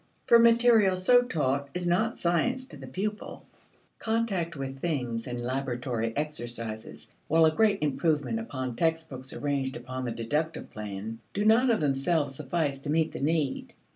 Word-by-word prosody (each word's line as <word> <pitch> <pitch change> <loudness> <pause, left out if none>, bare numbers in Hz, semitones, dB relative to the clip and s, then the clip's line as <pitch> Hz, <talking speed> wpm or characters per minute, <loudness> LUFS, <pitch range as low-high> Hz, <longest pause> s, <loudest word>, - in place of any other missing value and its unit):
For 235 - +7
material 230 -4 +5
so 245 +7 +5
taught 140 - -1
is 180 0 -1
not 190 +7 +1
science 240 +10 +1
to - - -9
the - - -10
pupil. 210 +3 -5 0.5
Contact 210 -7 -1
with 135 -1 -5
things 125 -8 -2
and 120 -1 -4
laboratory 125 -2 -2
exercises, 120 -7 -4 0.2
while 160 +1 +5
a 155 - +3
great 205 -2 +2
improvement 145 -5 0
upon 130 +1 -4
textbooks 160 -4 -2
arranged 140 -2 -2
upon 130 +1 -6
the 120 - -2
deductive 150 +8 -2
plan, 105 +1 -6
do 205 +1 -1
not 230 +4 +5
of 225 -7 +2
themselves 140 +1 +1
suffice 145 0 -2
to 145 - -7
meet 160 +1 +2
the - - -6
need. 150 -1 -1
150 Hz, 155 wpm, -28 LUFS, 130-180 Hz, 0.5 s, For